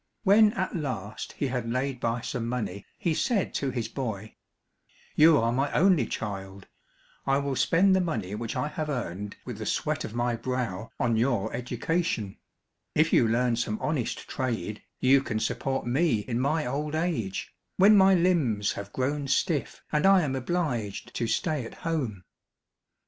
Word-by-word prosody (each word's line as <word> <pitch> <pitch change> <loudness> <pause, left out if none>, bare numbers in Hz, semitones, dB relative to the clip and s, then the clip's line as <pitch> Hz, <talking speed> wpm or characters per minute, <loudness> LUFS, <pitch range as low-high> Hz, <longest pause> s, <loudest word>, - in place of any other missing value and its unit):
When 210 +1 +6
at 190 -1 -2
last 130 - -4
he - - -2
had 125 -2 -2
laid 130 +1 -1
by 115 0 -1
some 120 -2 -3
money 110 -5 -4
he 170 - 0
said 210 +3 0
to 140 - -1
his 120 -3 -2
boy, 110 -5 -5 0.8
"You 155 0 +7
are 115 -2 +2
my 135 +4 0
only 175 - +4
child, 95 -2 -5 0.6
I 135 0 +3
will 140 -1 -1
spend 190 +7 +4
the 190 - +3
money 110 - -2
which 115 +2 -4
I - - 0
have 150 0 -4
earned 105 -7 -4
with - - -6
the - - -4
sweat - - -1
of 110 - -6
my 120 0 0
brow 115 -4 -3
on 115 -1 +2
your 115 -3 +1
education; 120 - -2 0.6
if 155 +2 +3
you 115 - +5
learn 120 +1 +2
some 110 -2 -1
honest 145 -6 -2
trade 110 -5 -3 0.2
you 135 +1 +5
can 110 -5 -2
support 135 +4 -1
me 125 -2 +2
in 120 +2 -3
my 150 +4 +1
old 150 +4 -2
age, 155 - -2 0.2
when 200 +3 +7
my 190 -1 +6
limbs 155 - +2
have 100 0 -7
grown 140 +2 -1
stiff 145 +2 0
and 150 +4 +3
I 195 -1 +6
am 135 -3 -1
obliged 130 - -2
to 115 - -1
stay 155 +1 0
at 115 - -9
home." 130 - -2
130 Hz, 170 wpm, -27 LUFS, 115-155 Hz, 0.8 s, You